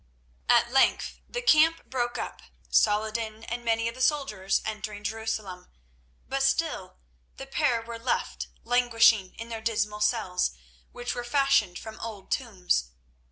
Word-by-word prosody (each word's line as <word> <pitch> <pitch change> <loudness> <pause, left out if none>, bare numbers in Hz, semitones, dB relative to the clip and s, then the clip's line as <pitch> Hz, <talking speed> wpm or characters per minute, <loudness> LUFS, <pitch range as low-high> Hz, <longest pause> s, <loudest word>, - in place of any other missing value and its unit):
At 240 - +5
length 270 +1 +2
the 485 0 -4
camp 325 -6 +5
broke 240 -2 -2
up, - - -5 0.3
Saladin 220 +1 +1
and 240 +1 -5
many 230 0 +1
of 230 - -3
the 255 - -8
soldiers 255 -10 +1
entering 210 -1 -5
Jerusalem; 210 -4 -4 0.6
but 275 0 -1
still 270 - 0 0.4
the 270 - -7
pair 270 -4 +1
were 230 0 -7
left 240 +2 -2 0.2
languishing 230 -5 +4
in 230 +1 -8
their 225 -1 -5
dismal 210 -2 -1
cells, 185 - +1 0.3
which 245 0 -4
were 245 - -4
fashioned 275 -7 +2
from 220 0 -9
old 215 -4 -8
tombs. 180 - 0
230 Hz, 140 wpm, -27 LUFS, 210-250 Hz, 0.6 s, At